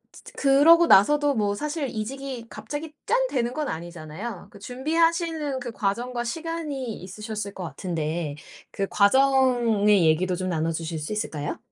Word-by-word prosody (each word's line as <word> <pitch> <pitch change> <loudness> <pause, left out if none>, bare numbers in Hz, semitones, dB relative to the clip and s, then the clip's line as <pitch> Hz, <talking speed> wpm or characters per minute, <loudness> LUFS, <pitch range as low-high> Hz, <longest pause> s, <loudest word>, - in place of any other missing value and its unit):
즈 - - -15
즈 - - -12
그러고 295 +5 +6
나서도 290 +4 +5
뭐 205 -4 0
사실 300 +4 -3
이직이 255 +2 -5
갑자기 290 +9 -7
짠 - - +3
되는 240 -3 -1
건 300 +2 -3
아니잖아요? 170 +4 -7
그 205 - -14
준비하시는 315 - 0
그 245 -1 -6
과정과 240 +4 -2
시간이 295 -2 -4
있으셨을 210 +2 -6
것 185 - -6
같은데 165 -3 -3 0.4
그 195 - -2
과정의 230 -4 +4
얘기도 180 +4 +2
좀 185 +1 -3
나눠 165 -1 0
주실 165 0 -4
수 150 +7 -4
있을까요? 155 -9 -3
230 Hz, 330 characters per minute, -25 LUFS, 185-280 Hz, 0.4 s, 그러고